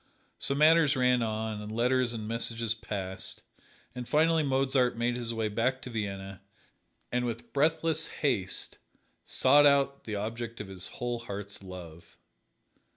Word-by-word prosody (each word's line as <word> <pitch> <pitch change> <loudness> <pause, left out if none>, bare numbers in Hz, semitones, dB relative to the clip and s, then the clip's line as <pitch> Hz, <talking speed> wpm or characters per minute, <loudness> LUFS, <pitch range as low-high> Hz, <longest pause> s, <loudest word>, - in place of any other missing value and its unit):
So 140 - 0
matters 155 0 +5
ran 125 -1 +3
on 110 -1 -2
and 105 0 -7
letters 125 +2 +2
and 110 -2 -5
messages 115 0 -1
passed, 95 -4 -5 0.5
and 125 -1 -7
finally 160 +1 +4
Mozart 130 -3 +2
made 120 +1 +1
his 120 -2 -2
way 115 -1 -1
back 115 +5 0
to 125 - -7
Vienna 100 -3 -4 0.7
and 125 0 +1
with 115 -1 -5
breathless 160 +2 +2
haste 110 -11 -1 0.5
sought 145 +3 +5
out 140 -1 +2
the 110 - -3
object 115 +3 -4
of 105 -2 -6
his 95 -1 -4
whole 120 -1 -2
heart's 100 -3 -6
love. 85 -3 -11
115 Hz, 145 wpm, -30 LUFS, 105-130 Hz, 0.7 s, matters